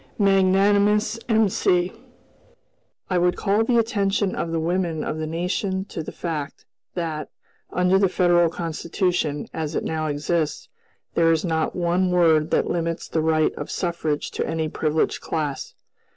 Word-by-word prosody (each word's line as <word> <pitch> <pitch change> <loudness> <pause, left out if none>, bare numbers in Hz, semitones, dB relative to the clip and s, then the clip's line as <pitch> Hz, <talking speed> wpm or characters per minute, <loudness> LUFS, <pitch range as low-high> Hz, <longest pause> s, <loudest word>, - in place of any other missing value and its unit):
Magnanimous 200 +2 +3
M.C.! 190 -4 +2 1.2
"I 180 - +3
would 180 0 +2
call 205 +2 +2
the 235 +1 +2
attention 200 -3 +1
of 165 - -3
the 165 - 0
women 170 -1 -1
of 155 - -3
the 155 - -3
nation 190 +4 -2
to 165 - -4
the 155 - -7
fact 155 -4 -5 0.3
that, 160 -4 -3 0.4
under 180 +1 +3
the 195 -2 +3
Federal 175 -2 +3
Constitution, 165 -1 -2
as 160 -1 -3
it - - -1
now 155 -1 -2
exists, 150 +2 -1 0.4
there 165 -1 +4
is 165 +2 +1
not 160 -2 -1
one 180 +1 +1
word 165 -3 +3
that - - +1
limits 165 -1 -2
the 160 - -1
right 155 0 +2
of 145 - -7
suffrage 165 -4 -2
to - - -2
any 160 -1 -1
privileged 155 0 0
class. 150 -4 -3
170 Hz, 150 wpm, -23 LUFS, 160-190 Hz, 1.2 s, there